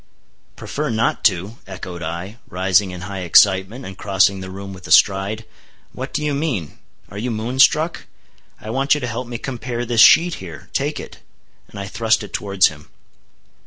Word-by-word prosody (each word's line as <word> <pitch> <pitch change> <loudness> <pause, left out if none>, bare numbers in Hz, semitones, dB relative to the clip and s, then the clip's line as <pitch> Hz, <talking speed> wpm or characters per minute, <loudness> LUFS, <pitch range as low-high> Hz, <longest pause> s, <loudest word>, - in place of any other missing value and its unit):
"Prefer 150 0 -4
not 110 0 0
to," 100 +3 +1
echoed 90 -2 -8
I, 90 +7 -6
rising 95 +2 +2
in 90 -1 -8
high 95 +1 -6
excitement, 95 +7 +3
and 95 - -8
crossing 100 0 +2
the 95 0 -7
room 95 +1 -8
with 90 -1 -11
a - - -8
stride. 100 +2 +3 0.5
"What 130 +2 -6
do 150 - -2
you 150 - 0
mean? 135 - -3 0.3
Are 100 - -7
you 125 +4 -2
moon 115 +3 -3
struck? 155 +4 +3 0.5
I 110 - -7
want 135 +4 +2
you - - -2
to 130 - -4
help 120 +1 -4
me 120 -1 -5
compare 120 -1 -4
this 115 -2 +3
sheet 170 +7 +7
here—take 85 -4 -4
it," - - -10 0.5
and 100 - -10
I 100 - -4
thrust 110 +2 +1
it 105 - -10
towards 100 -2 +2
him. 75 -1 -14
105 Hz, 180 wpm, -20 LUFS, 95-120 Hz, 0.5 s, sheet